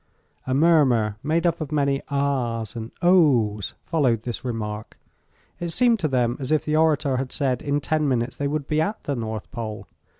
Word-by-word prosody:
A 130 - +1
murmur, 135 -9 +3
made 160 +4 0
up 170 -1 +1
of 155 - -4
many 140 -2 +1
"Ahs!" 130 -6 -1
and 115 -1 -5
"Ohs!" 125 - +3
followed 130 -9 +1
this 120 -2 -5
remark. 110 -3 -5 0.6
It 175 - -3
seemed 235 +5 +3
to 160 - 0
them 125 -3 0
as 135 +1 -4
if 155 - +2
the 150 - 0
orator 150 -4 +2
had 130 0 -3
said 130 -4 0
in 145 0 0
ten 155 +1 0
minutes 125 -2 0
they 145 - -2
would 145 -1 -2
be 155 0 +1
at 205 +7 -2
the 140 - -2
North 110 -2 -5
Pole. 115 -4 -5
140 Hz, 190 wpm, -24 LUFS, 115-155 Hz, 0.6 s, murmur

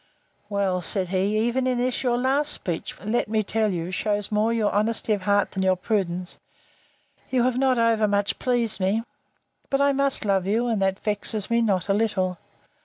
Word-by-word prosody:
Well, 195 -3 0
said 185 +1 0
he, 195 +3 0
even 255 +2 0
in 250 -1 0
this 250 +1 -1
your 245 -2 +1
last 275 +4 +2
speech, 170 -4 -3
which, 200 - -12
let 235 +3 0
me 215 0 0
tell 215 +1 0
you, 175 0 -4
shews 205 +2 -2
more 215 +2 +1
your 225 -3 +1
honesty 215 +1 0
of 205 - -2
heart 200 +1 +1
than 190 - -3
your 190 0 +3
prudence, 180 -2 -2 0.9
you 255 -2 +1
have 255 0 +1
not 265 -2 +2
over 230 -2 +2
much 205 0 0
pleased 240 -5 +2
me. 195 +4 0 0.7
But 275 - +1
I 280 0 +4
must 275 -3 +1
love 195 -2 +1
you; 225 +4 +1
and 225 -4 -1
that 190 0 +1
vexes 210 +1 -2
me 235 0 +3
not 195 -5 0
a 195 - +2
little. 195 -4 0
210 Hz, 195 wpm, -24 LUFS, 195-235 Hz, 0.9 s, I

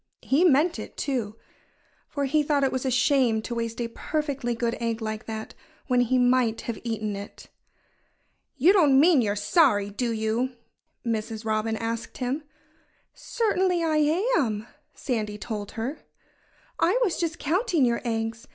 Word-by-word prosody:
He 285 +6 +3
meant 335 +1 +4
it, - - -9
too. 235 -7 -2 0.7
For 285 -2 -2
he 300 +3 +2
thought 290 -1 +1
it 270 - +2
was 260 +1 -2
a - - +2
shame 245 -2 +3
to 240 - -4
waste 230 0 -3
a 235 - -1
perfectly 275 -2 -2
good 235 0 -1
egg 230 -1 -1
like 220 0 -5
that, 220 -1 -6 0.3
when 250 -2 +2
he 245 +1 +2
might 245 -2 +2
have 230 -3 -5
eaten 215 -3 -2
it. 200 +1 -10 1.1
"You 325 +9 +5
don't 295 -9 +5
mean 315 -2 +6
you're 205 -3 0
sorry, 205 - +3
do 235 +4 -2
you?" 225 +3 -1 0.5
Mrs. 220 -1 -3
Robin 220 0 0
asked 230 0 -4
him. 260 +4 -2 0.7
"Certainly 375 -7 0
I 315 -2 +1 0.4
am!" 220 -6 -1 0.3
Sandy 215 -6 -3
told 210 -1 -5
her. 240 +7 -4 0.8
"I - - +3
was 385 -7 0
just 335 -1 -1
counting 335 - +1
your 235 -1 0
eggs. 225 -1 -3
245 Hz, 155 wpm, -26 LUFS, 220-285 Hz, 1.1 s, mean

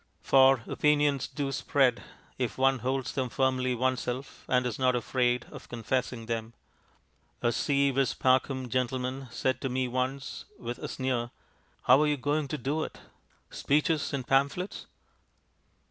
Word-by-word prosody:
For 135 -3 +5
opinions 145 -2 +2
do 140 -2 -3
spread, 135 -2 +2 0.4
if 125 -2 -2
one 135 0 +3
holds 130 +1 -1
them 130 -2 -1
firmly 130 0 +1
oneself 130 +1 -2
and 125 0 +3
is 120 -4 -3
not 130 -1 +3
afraid 125 0 +1
of - - -11
confessing 120 0 -2
them. 115 0 -3 0.9
A 120 - +3
si 140 +4 +2
vis 135 -2 +1
pacem 130 0 +2
gentleman 130 +2 -2
said 130 +1 -1
to 135 - -1
me 130 0 0
once, 130 +2 -3
with 120 +1 -6
a - - -5
sneer: 125 -3 -2 0.5
"How 130 +4 +6
are 150 - +3
you 150 -1 +1
going 145 +2 0
to 150 - -3
do 145 +5 -1
it? - - -7 0.5
Speeches 150 +2 +1
and 135 -3 -3
pamphlets?" 140 +9 0
130 Hz, 145 wpm, -29 LUFS, 125-140 Hz, 0.9 s, How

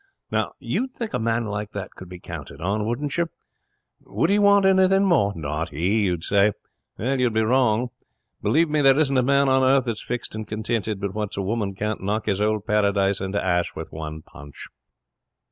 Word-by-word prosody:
'Now - - -1
you'd 260 +1 -2
think 230 -3 -5
a - - 0
man 115 0 0
like 105 0 -4
that 100 -2 -5
could 90 - -11
be 90 - -8
counted 70 -4 -9
on, 105 +5 -1
wouldn't 135 +5 -2
you? 170 -1 +1 0.7
Would 135 - -1
he 205 - +4
want 200 -1 +5
anything 190 +1 +4
more? 160 - +3
Not 80 +1 -3
he, 95 +8 +1
you'd 90 -3 -1
say. 100 +2 +3 0.4
You'd 125 0 0
be 110 - +3
wrong. 120 0 +2 0.5
Believe 165 +2 +3
me, 150 0 +1
there 135 -1 +5
isn't 145 -3 +2
a - - +5
man 140 +2 +3
on 130 0 +4
earth 130 0 +4
that's 115 -3 -3
fixed 120 0 -5
and 110 0 -5
contented 110 -1 -2
but 100 -1 -3
what 105 -2 -4
a 100 - -1
woman 100 -1 -2
can't 105 +1 -3
knock 105 +3 -1
his 100 -1 0
old 105 -1 0
Paradise 100 -2 +1
into 95 +1 -1
'ash 90 -1 0
with - - -7
one 80 0 -7
punch. 75 0 -12
110 Hz, 195 wpm, -23 LUFS, 100-130 Hz, 0.7 s, want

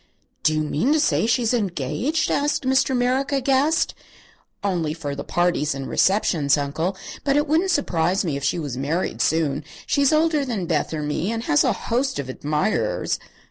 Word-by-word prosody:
"Do 155 - +2
you 155 - +1
mean 155 - +1
to 310 - +3
say 290 - +2
she's 235 0 +2
engaged?" 220 - -1
asked 290 +1 0
Mr. 265 0 +2
Merrick, 255 +3 +1
aghast. 275 +3 +2 0.7
"Only 170 -6 -1
for 145 -4 -4
the 140 - -5
parties 175 -4 0
and 135 -1 -5
receptions, 165 -8 +2
Uncle. 160 +7 -2 0.3
But 280 0 +2
it 295 - +2
wouldn't 325 +6 +2
surprise 190 - +1
me 155 -5 -1
if 140 - -5
she - - +1
was 145 -7 -4
married 145 +7 -2
soon. 155 -2 +1 0.2
She's 280 0 +2
older 310 -1 +2
than 225 -9 -3
Beth 160 -3 -1
or 155 -2 -3
me, 150 +7 -1
and 230 0 -3
has 145 -7 +3
a - - +3
host 260 +4 -1
of 140 -2 -4
admirers." 150 +8 -1
185 Hz, 180 wpm, -23 LUFS, -, 0.7 s, to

